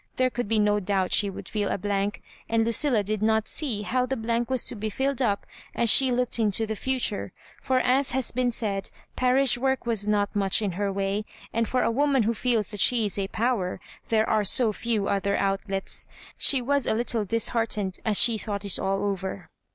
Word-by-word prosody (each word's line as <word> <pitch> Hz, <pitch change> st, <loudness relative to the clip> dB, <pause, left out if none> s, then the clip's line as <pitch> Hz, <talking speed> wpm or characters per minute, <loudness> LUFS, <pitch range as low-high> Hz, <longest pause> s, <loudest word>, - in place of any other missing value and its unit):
There 255 Hz, 0 st, +1 dB
could 245 Hz, -2 st, -3 dB
be 225 Hz, +1 st, +1 dB
no 210 Hz, 0 st, +2 dB
doubt 190 Hz, -2 st, -1 dB
she 200 Hz, -, +2 dB
would 195 Hz, -, -9 dB
feel 205 Hz, -2 st, -2 dB
a -, -, -1 dB
blank 200 Hz, +1 st, -2 dB
— -, -, -26 dB
and 225 Hz, 0 st, +2 dB
Lucilla 230 Hz, -1 st, +2 dB
did 210 Hz, +1 st, -2 dB
not 220 Hz, 0 st, +1 dB
see 240 Hz, -10 st, -2 dB
how 250 Hz, +6 st, 0 dB
the 265 Hz, +1 st, -2 dB
blank 230 Hz, +1 st, -2 dB
was 260 Hz, -1 st, +1 dB
to -, -, -1 dB
be 215 Hz, 0 st, -4 dB
filled 270 Hz, +4 st, -1 dB
up 205 Hz, -5 st, 0 dB, 0.3 s
as 235 Hz, -2 st, +4 dB
she 265 Hz, -1 st, +5 dB
looked 245 Hz, -1 st, +1 dB
into 220 Hz, 0 st, +2 dB
the 220 Hz, 0 st, -4 dB
future; 255 Hz, -3 st, -2 dB, 0.3 s
for, 260 Hz, -, 0 dB
as 260 Hz, +2 st, +2 dB
has 260 Hz, -2 st, +1 dB
been 250 Hz, 0 st, 0 dB
said, 200 Hz, -4 st, -2 dB, 0.3 s
parish 255 Hz, -1 st, +3 dB
work 265 Hz, 0 st, -1 dB
was 220 Hz, -3 st, +1 dB
not 205 Hz, 0 st, 0 dB
much 195 Hz, -2 st, +2 dB
in 205 Hz, -3 st, -1 dB
her 200 Hz, +3 st, -2 dB
way, 195 Hz, +2 st, -2 dB, 0.3 s
and 230 Hz, 0 st, 0 dB
for 255 Hz, -, +1 dB
a -, -, +1 dB
woman 275 Hz, 0 st, +2 dB
who 225 Hz, +2 st, 0 dB
feels 230 Hz, -2 st, 0 dB
that 205 Hz, -3 st, -2 dB
she 235 Hz, -1 st, +3 dB
is 205 Hz, 0 st, 0 dB
a 195 Hz, -, -1 dB
Power, 220 Hz, -5 st, -1 dB, 0.3 s
there 220 Hz, -1 st, +1 dB
are 215 Hz, -1 st, +1 dB
so 220 Hz, +2 st, +3 dB
few 215 Hz, -2 st, -1 dB
other 200 Hz, 0 st, 0 dB
outlets. 195 Hz, 0 st, -2 dB, 0.3 s
She 265 Hz, -3 st, +3 dB
was 280 Hz, 0 st, 0 dB
a -, -, +2 dB
little 230 Hz, -1 st, +1 dB
disheart 225 Hz, +2 st, 0 dB
ened 190 Hz, -3 st, -3 dB
as 215 Hz, -2 st, +2 dB
she 230 Hz, -2 st, +4 dB
thought 205 Hz, -1 st, -4 dB
it 200 Hz, -, +1 dB
all 195 Hz, 0 st, -1 dB
over. 190 Hz, -2 st, -4 dB
220 Hz, 220 wpm, -25 LUFS, 200-245 Hz, 0.3 s, she